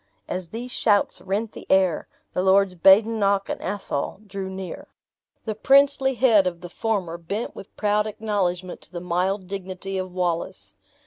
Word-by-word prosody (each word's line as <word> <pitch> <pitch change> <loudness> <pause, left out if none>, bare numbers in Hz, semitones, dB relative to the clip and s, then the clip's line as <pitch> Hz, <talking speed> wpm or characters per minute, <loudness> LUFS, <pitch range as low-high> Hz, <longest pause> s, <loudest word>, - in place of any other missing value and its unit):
As 180 -1 -4
these 240 +5 -5
shouts 205 -4 +2
rent 205 +3 -2
the - - -11
air, 190 -4 +3 0.3
the - - 0
Lords 190 0 +4
Badenoch 200 +2 +4
and - - -3
Athol 195 -4 -3
drew 195 -1 -5
near. 190 -2 -7 0.6
The 220 - -1
princely 270 +3 +4
head 225 -7 +5
of 170 -1 -4
the 175 - -8
former 180 -4 -2
bent 200 +7 -4
with 195 - -12
proud 210 0 +1
acknowledgement 190 -4 -2
to - - -10
the 175 - -5
mild 180 +3 -1
dignity 190 0 -5
of 185 0 -4
Wallace. 175 -2 -3
195 Hz, 155 wpm, -24 LUFS, 180-210 Hz, 0.6 s, head